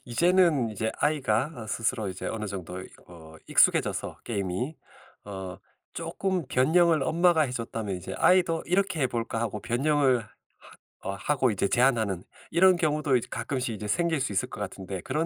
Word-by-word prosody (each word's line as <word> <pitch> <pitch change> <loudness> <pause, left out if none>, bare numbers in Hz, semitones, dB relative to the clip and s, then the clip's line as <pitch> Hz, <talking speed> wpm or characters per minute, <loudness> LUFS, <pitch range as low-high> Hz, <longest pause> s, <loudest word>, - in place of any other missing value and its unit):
이제는 165 -2 +3
이제 110 +1 -2
아이가 135 -3 +1
어 115 -3 -8
스스로 110 -1 -1
이제 95 0 -6
어느 110 -1 -3
정도 95 -2 -6
이 - - -11 0.2
어 80 -2 -13
익숙해져서 - - +2
게임이 100 - -3 0.5
어 95 -2 -7 0.3
쪼끔 170 0 -2
변형을 160 +4 +3
엄마가 170 +1 +3
해줬다면 115 -6 -3
이제 90 - -7
아이도 175 -3 +3
'이렇게 185 -3 +1
해볼까?' 115 -3 -1
하고 105 -2 -3
변형을 130 +2 +2
하 105 - -17 0.8
어 95 - -3
하고 130 +5 +1
이제 100 -2 0
제안하는 110 -7 +2 0.3
이런 185 +2 +5
경우도 150 -4 +1
이제 120 - 0
가끔씩 130 -5 -2
이제 105 0 -6
생길 165 - +1
수 130 - -1
있을 95 - 0
것 - - -7
같은데 95 -1 -5
그런 155 - -1
125 Hz, 355 characters per minute, -27 LUFS, 105-155 Hz, 0.8 s, 이런